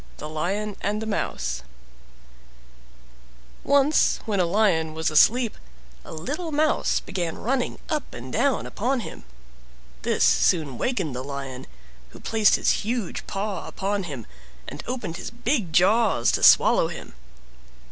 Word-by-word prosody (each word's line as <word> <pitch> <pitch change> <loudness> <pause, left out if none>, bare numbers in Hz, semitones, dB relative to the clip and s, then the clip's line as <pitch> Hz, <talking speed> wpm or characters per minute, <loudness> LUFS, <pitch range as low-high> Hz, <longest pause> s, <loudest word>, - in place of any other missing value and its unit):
THE 150 - -7
LION 190 +7 -3
AND 205 +2 -1
THE 220 - -4
MOUSE 65 - -2 2.0
Once 280 +2 +3
when 205 -3 -1
a 180 - +3
Lion 170 -5 +1
was 160 0 -1
asleep 230 +9 +4 0.5
a - - -11
little 290 - -4
Mouse 305 +1 +1
began 175 -4 -4
running 250 +2 -1
up 305 -2 -3
and 125 +2 -9
down 280 -2 +1
upon 245 +4 -1
him; 65 - -9 0.8
this - - +1
soon 150 -8 +2
wakened 185 - -1
the 125 - -4
Lion, 135 -2 -6 0.4
who - - -14
placed 220 -2 +3
his - - +1
huge 225 -3 -3
paw 195 -1 -4
upon 195 0 -2
him, 135 -9 -7 0.4
and - - -7
opened 240 -9 -4
his - - -6
big 235 - -1
jaws 190 - +3
to - - -1
swallow - - +6
him. - - -9
200 Hz, 135 wpm, -24 LUFS, 155-240 Hz, 2.0 s, swallow